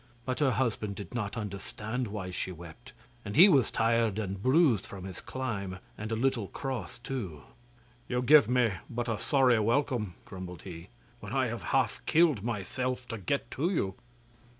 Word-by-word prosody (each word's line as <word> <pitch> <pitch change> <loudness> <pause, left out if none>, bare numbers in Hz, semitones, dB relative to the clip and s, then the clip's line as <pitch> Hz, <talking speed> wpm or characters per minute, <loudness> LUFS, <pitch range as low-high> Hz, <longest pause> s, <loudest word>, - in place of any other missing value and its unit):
But 130 -1 -2
her 145 -3 +4
husband 110 -5 -1
did 100 +4 -8
not 105 -4 -3
understand 110 +3 -4
why 100 -3 -5
she 95 - -3
wept, 85 -2 -11 0.3
and 100 - -5
he 180 +6 +10
was 140 - +4
tired 115 -2 +2
and 100 -3 -3
bruised 130 - +4
from 95 -2 -9
his 95 -1 -7
climb, 105 -8 -4 0.2
and 110 +2 -6
a - - +1
little 120 -3 0
cross 130 -9 -5
too. 115 - -5 0.7
'You 125 0 0
give 140 -3 +7
me 125 -3 +3 0.2
but 120 +1 -3
a 115 -2 -1
sorry 130 -5 +4
welcome,' 115 -3 +1
grumbled 90 -3 -8
he, 85 -3 -8 0.3
'when - - -7
I - - +2
have - - -4
half - - 0
killed 155 - +4
myself 125 +3 -2
to 115 -3 -4
get 120 +5 -2
to 160 +6 0
you. 100 - 0
115 Hz, 175 wpm, -30 LUFS, 100-130 Hz, 0.7 s, he